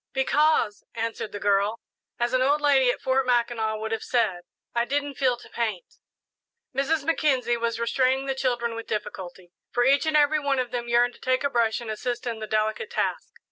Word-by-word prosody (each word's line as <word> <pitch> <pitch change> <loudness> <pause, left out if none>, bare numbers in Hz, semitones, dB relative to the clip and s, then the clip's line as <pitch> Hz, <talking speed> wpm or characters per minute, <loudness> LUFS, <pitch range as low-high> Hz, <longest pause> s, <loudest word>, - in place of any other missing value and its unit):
"Because," 265 -5 +2
answered 225 -1 -3
the 205 - -6
girl, 205 +2 +1 0.4
"as 240 +1 0
an 255 - +3
old 285 +3 +3
lady 275 -4 +4
at - - 0
Fort 265 +1 +2
Mackinac 235 -3 +1
would 220 +1 -5
have 225 - -1
said, 220 -8 0 0.3
I 235 - +2
didn't 285 +3 -2
'feel 255 -2 +1
to - - -14
paint.'" 220 -6 -4 0.8
Mrs. 280 +2 +1
Mackenzie 270 -7 +1
was 230 0 -2
restraining 260 +3 +1
the 270 - -1
children 240 -3 -1
with 230 0 -7
difficulty, 185 -4 -6 0.2
for 245 - +1
each 280 +4 +3
and 310 -1 +3
every 300 +1 +4
one 280 -2 0
of 250 -2 -1
them 240 -1 -3
yearned 240 +1 +3
to - - -18
take 255 +1 +1
a 280 - 0
brush 230 -3 +1
and 225 -2 -5
assist 240 +3 -4
in 230 -2 -3
the 215 - -5
delicate 215 - -1
task. 480 - -2
245 Hz, 200 wpm, -25 LUFS, 225-270 Hz, 0.8 s, lady